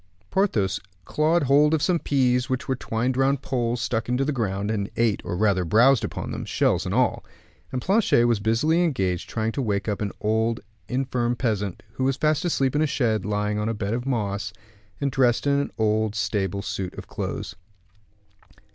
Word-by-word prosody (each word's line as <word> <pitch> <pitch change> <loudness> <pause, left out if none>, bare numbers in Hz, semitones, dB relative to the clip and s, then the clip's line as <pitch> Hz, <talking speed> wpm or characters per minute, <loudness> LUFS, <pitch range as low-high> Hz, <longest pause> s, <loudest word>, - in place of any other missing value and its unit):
Porthos 100 - +1 0.3
clawed 155 +2 +2
hold 145 +3 +4
of 155 - -1
some 175 -2 +2
peas 125 -4 +1
which 130 -1 -2
were 130 - +1
twined 120 +3 -1
round 135 +1 +1
poles 120 -2 -1
stuck 115 -1 -2
into 125 +2 +1
the 150 - 0
ground, 100 -5 -1
and 100 -2 -2
ate, 115 -3 +2
or 90 - -3
rather 100 -2 +2
browsed 120 +9 +4
upon - - -4
them, - - -4
shells - - +1
and - - -2
all: - - +2 0.5
and 130 -1 -3
Planchet 195 - +3
was 120 -3 +2
busily 135 +11 +2
engaged 95 - -1
trying 110 0 -1
to 140 - -3
wake 100 -4 -1
up 105 -1 -2
an 100 -1 -1
old 110 +2 +1 0.3
and 130 +2 0
infirm 120 -2 0
peasant, 105 -7 -2
who 130 - -3
was 135 0 +1
fast 155 0 +1
asleep 135 -6 +1
in 150 - +2
a 155 - +3
shed, 110 -8 0
lying 105 0 -1
on 105 +1 -1
a 115 - -1
bed 105 0 -2
of 120 +2 -3
moss, 105 -5 -1 0.5
and 140 -1 0
dressed 125 -2 +2
in 140 0 +3
an 140 - -2
old 110 -1 +1
stable 100 -2 -1
suit 95 -3 -4
of - - -8
clothes. - - -5
120 Hz, 195 wpm, -24 LUFS, 105-135 Hz, 0.5 s, hold